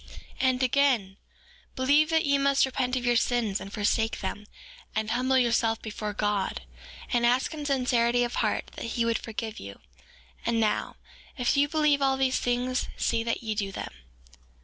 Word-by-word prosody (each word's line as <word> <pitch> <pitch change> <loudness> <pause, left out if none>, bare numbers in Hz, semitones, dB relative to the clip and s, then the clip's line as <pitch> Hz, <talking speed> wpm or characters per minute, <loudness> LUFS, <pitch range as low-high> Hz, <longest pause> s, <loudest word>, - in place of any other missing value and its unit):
4:10 - - -21 0.4
And 255 0 0
again, 250 -7 +2 0.6
believe 285 +4 +3
that 320 -1 +2
ye 280 -1 +2
must 275 0 +3
repent 255 -1 -1
of 250 -1 -2
your 240 0 +3
sins 235 -4 +1
and 195 - -8
forsake 220 +2 0
them, 205 +2 -5 0.5
and 220 0 -1
humble 255 +2 +2
yourselves 230 -2 +2
before 210 -1 -4
God; 205 -1 -1 0.5
and 240 -1 +2
ask 250 +5 +2
in 300 -2 -5
sincerity 245 -3 +2
of 240 - -3
heart - - -1
that - - -5
he 235 - +2
would 230 0 +1
forgive 225 -1 -6
you; 100 0 -9 0.6
and 230 0 0
now, 215 -1 0 0.4
if 245 +1 +1
you 285 +1 +3
believe 300 -2 +2
all 270 -1 +2
these 265 -1 +1
things 245 +1 -1
see 230 -1 0
that 230 +1 -2
ye 220 -1 -2
do 200 -2 -3
them. - - -6
245 Hz, 175 wpm, -27 LUFS, 220-265 Hz, 0.6 s, believe